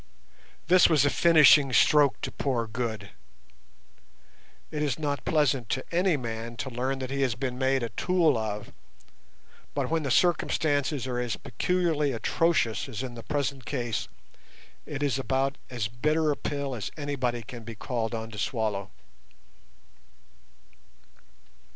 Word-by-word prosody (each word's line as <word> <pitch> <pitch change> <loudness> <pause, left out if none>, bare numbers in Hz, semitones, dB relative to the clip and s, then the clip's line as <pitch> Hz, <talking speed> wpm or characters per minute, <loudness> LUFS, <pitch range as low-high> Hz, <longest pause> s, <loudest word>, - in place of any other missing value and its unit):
This 180 +2 +6
was 150 -4 +4
a 145 - +3
finishing 155 -4 +6
stroke 145 +2 +4
to - - -3
poor 125 -5 -1
Good. 110 -3 -4 1.6
It 150 - -3
is 145 -4 0
not 145 -2 -2
pleasant 135 -7 +1
to 130 - -2
any 180 -2 +2
man 115 -1 -5
to 130 - -4
learn 130 +3 -2
that 130 0 -5
he 140 0 -1
has 130 -4 +1
been 125 0 -4
made 130 -1 +1
a 115 - -2
tool 170 -3 +2
of, 105 -2 -4 1.0
but - - -1
when 165 0 +1
the 140 - -3
circumstances 145 -3 +1
are 125 -1 -2
as 120 -2 -1
peculiarly 155 0 0
atrocious 120 -1 +1
as 125 0 -5
in 125 -2 -6
the 115 - -8
present 140 0 -2
case, 120 -5 -2 0.8
it 145 0 -4
is 140 -2 0
about 135 +1 0
as 120 -4 -2
bitter 150 +7 +1
a - - 0
pill 140 -2 -3
as 115 -4 -4
anybody 130 -5 -2
can 115 +1 -9
be 115 0 -8
called 115 +1 -3
on 110 0 -5
to 105 - -7
swallow. 105 -4 -2
130 Hz, 145 wpm, -27 LUFS, 120-145 Hz, 1.6 s, This